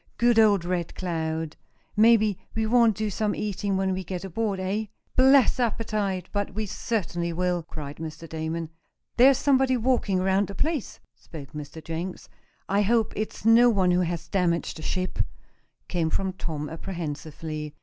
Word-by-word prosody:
"Good 235 Hz, -1 st, +4 dB
old 205 Hz, -5 st, +5 dB
Red 175 Hz, -2 st, -2 dB
Cloud! 160 Hz, -3 st, -3 dB, 0.4 s
Maybe 215 Hz, -2 st, +4 dB, 0.2 s
we 220 Hz, 0 st, +1 dB
won't 230 Hz, -1 st, +4 dB
do 215 Hz, -1 st, -1 dB
some 210 Hz, +2 st, -1 dB
eating 200 Hz, -1 st, -2 dB
when 190 Hz, 0 st, +1 dB
we 185 Hz, 0 st, -3 dB
get 180 Hz, +1 st, -5 dB
aboard, 200 Hz, +1 st, -2 dB
eh?" 195 Hz, +4 st, -1 dB, 0.3 s
"Bless 265 Hz, 0 st, +5 dB
my 245 Hz, -, +4 dB
appetite! 205 Hz, -5 st, -2 dB
but 205 Hz, -2 st, -2 dB
we 215 Hz, 0 st, -1 dB
certainly 175 Hz, -5 st, -2 dB
will!" 180 Hz, +1 st, 0 dB
cried 150 Hz, -3 st, -8 dB
Mr. 160 Hz, +1 st, -7 dB
Damon. 160 Hz, 0 st, -4 dB, 0.5 s
"There's 260 Hz, +2 st, +7 dB
somebody 265 Hz, -2 st, +3 dB
walking 230 Hz, -6 st, +1 dB
around 190 Hz, +1 st, +2 dB
the 200 Hz, -, -8 dB
place," 310 Hz, -, -2 dB
spoke 145 Hz, -4 st, -11 dB
Mr. 150 Hz, +1 st, -8 dB
Jenks. 165 Hz, +3 st, -5 dB, 0.4 s
"I 200 Hz, +1 st, +2 dB
hope 225 Hz, +2 st, +2 dB
it's 215 Hz, 0 st, -4 dB
no 235 Hz, +2 st, +7 dB
one 190 Hz, -5 st, +3 dB
who 180 Hz, -, +3 dB
has 170 Hz, -1 st, -2 dB
damaged 170 Hz, -2 st, 0 dB
the -, -, -8 dB
ship," 185 Hz, +3 st, -2 dB, 0.7 s
came 170 Hz, -3 st, 0 dB
from 190 Hz, +2 st, -1 dB
Tom, 155 Hz, -5 st, -4 dB
apprehensively. 155 Hz, -3 st, -6 dB
190 Hz, 160 wpm, -26 LUFS, 165-220 Hz, 0.7 s, There's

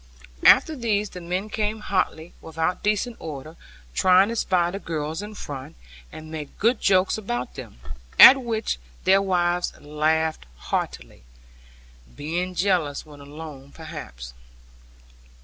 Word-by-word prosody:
After 315 Hz, -, +6 dB
these 210 Hz, -5 st, -1 dB
the 180 Hz, -, -8 dB
men 180 Hz, +4 st, -3 dB
came 215 Hz, 0 st, -2 dB
hotly, 180 Hz, -4 st, -2 dB
without 165 Hz, +2 st, -2 dB
decent 215 Hz, +3 st, -1 dB
order, 155 Hz, +1 st, -8 dB, 0.4 s
trying 185 Hz, -, +5 dB
to 230 Hz, -, -3 dB
spy 180 Hz, -5 st, +1 dB
the 195 Hz, -, -5 dB
girls 160 Hz, -1 st, -4 dB
in 210 Hz, +1 st, -8 dB
front, 140 Hz, -8 st, -8 dB, 0.4 s
and 155 Hz, 0 st, -10 dB
make 150 Hz, -3 st, -7 dB
good 235 Hz, +4 st, +2 dB
jokes 190 Hz, +2 st, +3 dB
about 125 Hz, -, -4 dB
them, -, -, -10 dB, 0.4 s
at 270 Hz, +1 st, +11 dB
which 225 Hz, -, -2 dB, 0.2 s
their 195 Hz, +1 st, +5 dB
wives 180 Hz, -2 st, 0 dB
laughed 155 Hz, -, -1 dB
heartily, -, -, -4 dB, 0.9 s
being 175 Hz, +5 st, -3 dB
jealous 175 Hz, -6 st, 0 dB
when 150 Hz, -2 st, -14 dB
alone 140 Hz, -1 st, -10 dB
perhaps. 60 Hz, -, -9 dB
175 Hz, 130 wpm, -24 LUFS, 150-200 Hz, 0.9 s, at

